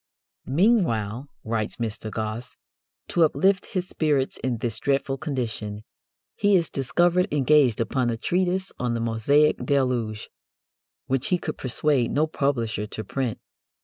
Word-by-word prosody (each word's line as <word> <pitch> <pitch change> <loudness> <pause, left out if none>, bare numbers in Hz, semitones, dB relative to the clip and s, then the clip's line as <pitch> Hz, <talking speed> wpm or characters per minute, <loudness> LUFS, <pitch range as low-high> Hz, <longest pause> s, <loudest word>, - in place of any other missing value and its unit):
'" - - -69
"Meanwhile," 135 - +2 0.2
writes 110 -1 -2
Mr. 110 -2 -4
Gosse, 110 +3 -4 0.5
"to 170 - +3
uplift 190 +5 +2
his 185 -1 -3
spirits 145 -6 0
in 125 -2 0
this 110 -1 -2
dreadful 135 0 0
condition, 110 -7 -4 0.5
he 205 -1 +3
is 170 -3 +1
discovered 175 +7 +2
engaged 145 -4 +4
upon 120 +1 0
a 115 - -1
treatise 185 +7 0
on 120 -1 0
the - - -1
Mosaic 115 +7 +3
deluge, 125 -6 0 0.7
which 135 -1 -1
he 180 - +2
could 155 -3 -5
persuade 130 0 +1
no 150 +2 +2
publisher 120 -8 -1
to 110 - -6
print. 125 +1 -2
130 Hz, 140 wpm, -25 LUFS, 115-155 Hz, 0.7 s, engaged